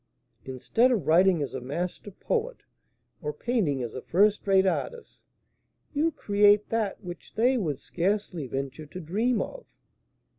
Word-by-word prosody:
Instead 180 - +1
of 210 - 0
writing 175 -1 +4
as 140 - -6
a 130 - -4
master 170 +10 -4
poet, 470 - -3 0.6
or 150 -2 -2
painting 150 - -1
as 115 - -5
a 130 - -6
first 205 +4 +2
rate 190 -1 +4
artist, 475 - -3 0.7
you 315 +3 +1
create 205 -4 +3
that 220 -3 -2
which 175 -2 -9
they 245 +4 +3
would 160 - -1
scarcely 180 -2 -2
venture 135 +4 -5
to 180 - -8
dream 215 +8 0
of." - - -10
190 Hz, 145 wpm, -27 LUFS, 150-225 Hz, 0.7 s, writing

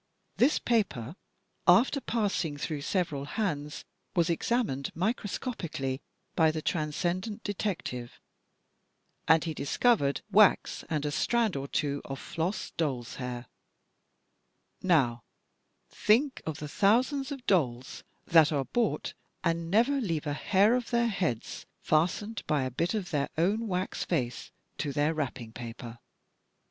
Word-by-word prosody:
This 265 +6 +4
paper, 185 - 0 0.5
after 270 +3 +5
passing 195 - -1
through 145 0 -3
several 150 -5 -1
hands, 150 -5 -3 0.3
was 170 -1 +3
examined 170 - 0
microscopically 180 - -2 0.3
by 160 -1 +5
the 155 0 -3
Transcendent 175 +7 -2
Detective, 180 - -4 1.1
and 160 -1 +5
he 165 -2 -2
discovered 145 - +2
wax 210 -1 +4
and 150 -3 -1
a 145 - -1
strand 230 +5 +1
or 135 0 -3
two 140 0 -1
of 135 - -6
floss 170 +8 -3
doll's 130 -7 -2
hain 125 -1 -5 1.4
Now, 135 -10 +3 0.7
think 255 +6 +2
of 155 -2 -3
the 150 - -6
thousands 255 - +2
of 275 -3 -6
dolls 130 -9 0 0.2
that 160 -2 +6
are 140 -3 0
bought 230 - -1 0.3
and 165 -1 0
never 240 +8 +3
leave 165 -8 -2
a 145 - -1
hair 200 +8 +3
of 250 -1 -1
their 235 -1 +2
heads 175 - -2 0.2
fastened 185 +7 +1
by 150 -4 +2
a 130 - -2
bit 170 - -1
of 195 -5 -3
their 145 -3 0
own 205 +7 +1
wax 185 -1 -2
face 125 -8 -2 0.3
to 145 - -1
their 145 +3 +2
wrapping 130 -7 -4
paper! 115 0 -8
165 Hz, 130 wpm, -29 LUFS, 140-210 Hz, 1.4 s, that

